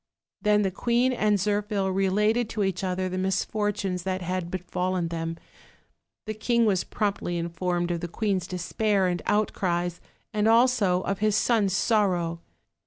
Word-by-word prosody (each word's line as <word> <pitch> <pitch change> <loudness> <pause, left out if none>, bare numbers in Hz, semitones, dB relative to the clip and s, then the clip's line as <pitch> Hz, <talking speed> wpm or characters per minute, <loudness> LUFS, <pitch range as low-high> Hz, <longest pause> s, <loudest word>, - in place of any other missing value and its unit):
Then 210 0 +3
the 190 - 0
queen 240 +5 +1
and 210 -4 +2
Zirphil 205 -1 0
related 210 +4 +2
to 215 -2 -1
each 190 -1 -1
other 185 0 -1
the 185 0 -3
misfortunes 195 0 -1
that 185 0 -3
had 180 0 -2
befallen 180 -1 -2
them. 165 0 -4 0.9
The 215 - -3
king 235 +2 +1
was 195 -4 +2
promptly 200 -4 -2
informed 175 +1 -1
of 170 - -1
the 175 - -4
queen's 190 -1 -1
despair 195 +2 0
and 175 -2 -1
outcries, 175 -4 0 0.3
as 210 0 +2
also 225 -6 +4
of 195 +1 -2
his 215 -1 +2
son's 215 -4 +2
sorrow. 185 -6 +1
190 Hz, 150 wpm, -26 LUFS, 180-210 Hz, 0.9 s, also